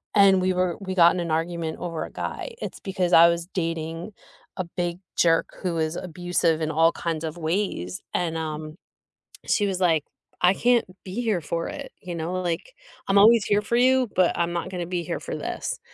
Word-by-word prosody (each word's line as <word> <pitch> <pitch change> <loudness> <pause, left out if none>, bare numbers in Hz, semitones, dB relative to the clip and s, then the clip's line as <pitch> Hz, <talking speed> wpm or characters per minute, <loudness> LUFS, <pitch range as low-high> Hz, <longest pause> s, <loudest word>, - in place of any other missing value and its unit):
and 195 -2 +6
we 185 0 +2
were 180 -1 0
we 190 -1 -4
got 170 -1 +7
in 180 - -2
an 170 -2 -3
argument 165 0 -2
over 165 -2 -3
a - - -11
guy, - - -5
it's - - -6
because 185 -2 -1
I 170 +1 +9
was 170 0 -2
dating 165 +1 -3 0.5
a 185 - -2
big 175 0 -3 0.2
jerk 165 -1 +3
who 180 -3 -1
was 160 0 -1
abusive 175 -2 0
in 155 - 0
all 165 +2 +4
kinds 165 -2 -3
of 160 +1 -4
ways, 160 - -2
and, 165 -2 -1
um, 155 0 -5 0.7
she 205 - +2
was 190 -2 -2
like, 165 -5 +3 0.4
"I 180 +1 +6
can't 240 +1 +3 0.2
be 195 +6 -4
here 215 -7 0
for 165 +2 -3
it." - - -7
You 175 -1 -6
know, 165 +2 -3
like, 175 - -3 0.3
"I'm 195 - +3
always 225 +1 +6
here 205 -1 +2
for 235 - -1
you, 255 -1 +4
but 185 -2 +3
I'm 170 0 0
not 170 -1 -3
gonna 175 -2 -3
be 180 -1 -2
here - - -3
for - - -5
this." - - -4
175 Hz, 205 wpm, -25 LUFS, 165-190 Hz, 0.7 s, I